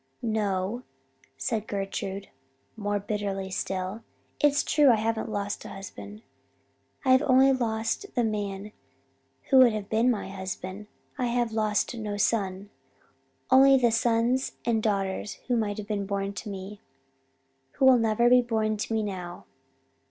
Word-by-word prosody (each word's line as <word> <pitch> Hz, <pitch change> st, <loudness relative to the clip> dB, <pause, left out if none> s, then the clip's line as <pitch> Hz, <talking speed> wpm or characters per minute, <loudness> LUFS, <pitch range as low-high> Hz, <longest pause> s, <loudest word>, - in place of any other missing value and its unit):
"'No,' 210 Hz, 0 st, -1 dB, 0.6 s
said 220 Hz, -2 st, -2 dB
Gertrude, 195 Hz, 0 st, -4 dB, 0.5 s
more 205 Hz, -2 st, -1 dB
bitterly 195 Hz, -2 st, -3 dB
still. 190 Hz, +3 st, -3 dB, 0.4 s
'It's 290 Hz, -1 st, +3 dB
true 295 Hz, -3 st, +4 dB
I 235 Hz, -, +6 dB
haven't 220 Hz, +1 st, -1 dB
lost 205 Hz, -1 st, -3 dB
a -, -, -8 dB
husband 205 Hz, +2 st, -9 dB, 0.8 s
I 260 Hz, -, +4 dB
have 260 Hz, +1 st, +6 dB
only 265 Hz, -1 st, +5 dB
lost 230 Hz, -, -1 dB
the 245 Hz, -, +2 dB
man 205 Hz, -2 st, -3 dB, 0.8 s
who 265 Hz, -, +7 dB
would 245 Hz, -3 st, +7 dB
have 210 Hz, -2 st, -5 dB
been 225 Hz, +3 st, +3 dB
my 220 Hz, -6 st, -1 dB
husband. 190 Hz, +1 st, -6 dB, 0.3 s
I 250 Hz, -, +1 dB
have 240 Hz, -1 st, 0 dB
lost 215 Hz, 0 st, 0 dB
no 210 Hz, -3 st, -4 dB
son 200 Hz, -2 st, -1 dB, 0.8 s
only 270 Hz, +1 st, +7 dB
the 240 Hz, -3 st, +3 dB
sons 235 Hz, +3 st, +1 dB
and 230 Hz, -2 st, +1 dB
daughters 200 Hz, -1 st, -1 dB
who 250 Hz, -, +1 dB
might 210 Hz, -2 st, -1 dB
have 210 Hz, -1 st, -6 dB
been 205 Hz, -2 st, -2 dB
born 200 Hz, 0 st, -2 dB
to 210 Hz, +2 st, -7 dB
me 200 Hz, +1 st, -8 dB, 0.9 s
who 270 Hz, -, +1 dB
will 260 Hz, -2 st, +7 dB
never 225 Hz, +1 st, +2 dB
be 250 Hz, +1 st, +6 dB
born 220 Hz, -2 st, -1 dB
to 210 Hz, -, -4 dB
me 220 Hz, -, +1 dB
now.' 180 Hz, -4 st, -6 dB
215 Hz, 150 wpm, -27 LUFS, 200-235 Hz, 0.9 s, who